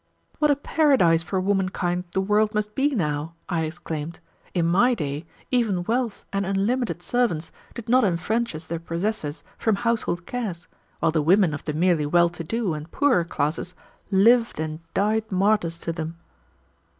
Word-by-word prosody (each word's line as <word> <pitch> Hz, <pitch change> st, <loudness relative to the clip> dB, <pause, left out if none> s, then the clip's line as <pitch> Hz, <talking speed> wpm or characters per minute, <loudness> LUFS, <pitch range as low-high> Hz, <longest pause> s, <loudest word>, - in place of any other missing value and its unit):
"What 300 Hz, -1 st, +3 dB
a 290 Hz, -, +5 dB
paradise 270 Hz, -, +3 dB
for 185 Hz, +3 st, -2 dB
womankind 185 Hz, -2 st, 0 dB
the 190 Hz, -, +1 dB
world 210 Hz, +2 st, +2 dB
must 210 Hz, 0 st, -1 dB
be 280 Hz, +3 st, +1 dB
now!" 150 Hz, -3 st, -2 dB
I 170 Hz, -3 st, 0 dB
exclaimed. 160 Hz, -1 st, -5 dB, 0.4 s
"In 170 Hz, -2 st, +2 dB
my 200 Hz, +9 st, +4 dB
day, 150 Hz, -2 st, -4 dB, 0.2 s
even 220 Hz, -8 st, +1 dB
wealth 235 Hz, +2 st, -1 dB
and 195 Hz, 0 st, 0 dB
unlimited 200 Hz, +1 st, -1 dB
servants 175 Hz, -6 st, 0 dB, 0.2 s
did 235 Hz, -1 st, -7 dB
not 255 Hz, +2 st, +4 dB
enfranchise 180 Hz, -1 st, -1 dB
their 170 Hz, 0 st, -3 dB
possessors 170 Hz, -1 st, -3 dB, 0.2 s
from 220 Hz, -2 st, +2 dB
household 215 Hz, -6 st, -1 dB
cares, 210 Hz, -9 st, -4 dB, 0.3 s
while -, -, +3 dB
the 160 Hz, -1 st, +1 dB
women 175 Hz, +1 st, +4 dB
of 145 Hz, -, -6 dB
the 150 Hz, -, -2 dB
merely 165 Hz, -2 st, +2 dB
well 170 Hz, +2 st, +4 dB
to 175 Hz, 0 st, -7 dB
do 215 Hz, +1 st, -1 dB
and 155 Hz, +1 st, -6 dB
poorer 275 Hz, -, +3 dB
classes 165 Hz, +2 st, -2 dB, 0.3 s
lived 230 Hz, +3 st, +4 dB
and 155 Hz, 0 st, -3 dB, 0.2 s
died 215 Hz, +2 st, +1 dB
martyrs 190 Hz, -3 st, +2 dB
to 165 Hz, 0 st, -4 dB
them." 165 Hz, 0 st, -5 dB
185 Hz, 160 wpm, -24 LUFS, 165-220 Hz, 0.4 s, a